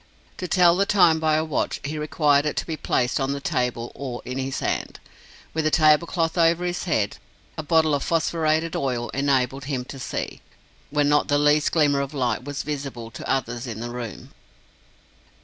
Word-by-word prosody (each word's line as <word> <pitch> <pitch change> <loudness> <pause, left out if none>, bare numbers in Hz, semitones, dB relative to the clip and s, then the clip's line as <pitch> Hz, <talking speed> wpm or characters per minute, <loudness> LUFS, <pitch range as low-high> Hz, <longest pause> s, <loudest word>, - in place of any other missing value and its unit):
To 180 - -4
tell 175 -1 +5
the 200 +2 +1
time 175 -6 +5
by 155 -1 +2
a 155 +1 +1
watch, 155 - -1
he 150 +2 -4
required 150 -1 +2
it 150 - -3
to - - -1
be 160 - -3
placed 125 -4 0
on 135 0 0
the 140 - -4
table, 125 -3 -2
or 130 -3 -6
in 125 +1 -4
his 135 0 -3
hand. - - -3 0.5
With 160 - 0
the 155 - +2
tablecloth 165 +2 +3
over 170 +1 +3
his 175 0 -2
head, 110 - 0 0.4
a - - -3
bottle 160 0 +3
of 140 - +1
phosphorated 160 0 0
oil 125 -3 -1
enabled 135 -1 0
him 130 -3 -3
to 135 - -9
see, - - -5 0.5
when 145 0 +1
not 145 0 +3
the 145 - +2
least 150 +1 +3
glimmer 145 -4 +3
of 140 +2 -5
light 125 -3 0
was 145 0 -4
visible 135 -6 -5
to 125 - -8
others 120 -1 -1
in 110 -2 -5
the 120 +1 -5
room. 120 -2 -7
145 Hz, 190 wpm, -24 LUFS, 130-160 Hz, 0.5 s, tell